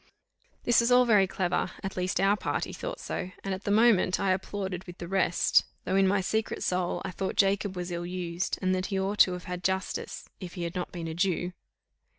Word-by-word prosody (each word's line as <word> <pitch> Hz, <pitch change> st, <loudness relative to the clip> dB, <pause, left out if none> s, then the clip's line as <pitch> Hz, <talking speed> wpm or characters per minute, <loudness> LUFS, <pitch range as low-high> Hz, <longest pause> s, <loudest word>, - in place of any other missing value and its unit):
This 240 Hz, -, +4 dB
was 235 Hz, +1 st, +1 dB
all 250 Hz, 0 st, +6 dB
very 210 Hz, -5 st, +5 dB
clever, 185 Hz, -1 st, 0 dB
at 195 Hz, -, -4 dB
least 185 Hz, 0 st, -1 dB
our 195 Hz, +1 st, +4 dB
party -, -, -2 dB
thought -, -, -5 dB
so, 180 Hz, -, -4 dB
and 195 Hz, -, -2 dB
at 190 Hz, -, -6 dB
the -, -, -1 dB
moment 205 Hz, -4 st, +4 dB
I 195 Hz, -1 st, +2 dB
applauded 190 Hz, -1 st, -3 dB
with 175 Hz, 0 st, -9 dB
the 170 Hz, -, -6 dB
rest, 185 Hz, -1 st, +3 dB, 0.2 s
though 190 Hz, -, 0 dB
in 195 Hz, 0 st, +5 dB
my 195 Hz, +1 st, +2 dB
secret 220 Hz, +4 st, -1 dB
soul 180 Hz, -1 st, -1 dB
I 190 Hz, -, -3 dB
thought 190 Hz, +2 st, -3 dB
Jacob 195 Hz, 0 st, +2 dB
was 180 Hz, 0 st, -4 dB
ill 175 Hz, 0 st, -3 dB
used, 175 Hz, -1 st, -2 dB
and 185 Hz, 0 st, +2 dB
that 185 Hz, 0 st, -1 dB
he 195 Hz, -2 st, -1 dB
ought 200 Hz, +2 st, -2 dB
to 185 Hz, -, +6 dB
have 180 Hz, -, -6 dB
had 180 Hz, 0 st, -5 dB
justice, 190 Hz, +1 st, -2 dB
if 180 Hz, 0 st, -8 dB
he 175 Hz, -, -4 dB
had 170 Hz, 0 st, -3 dB
not 180 Hz, -1 st, -4 dB
been 170 Hz, -2 st, -5 dB
a 160 Hz, -, -4 dB
Jew. 180 Hz, 0 st, 0 dB
185 Hz, 225 wpm, -28 LUFS, 180-195 Hz, 0.2 s, all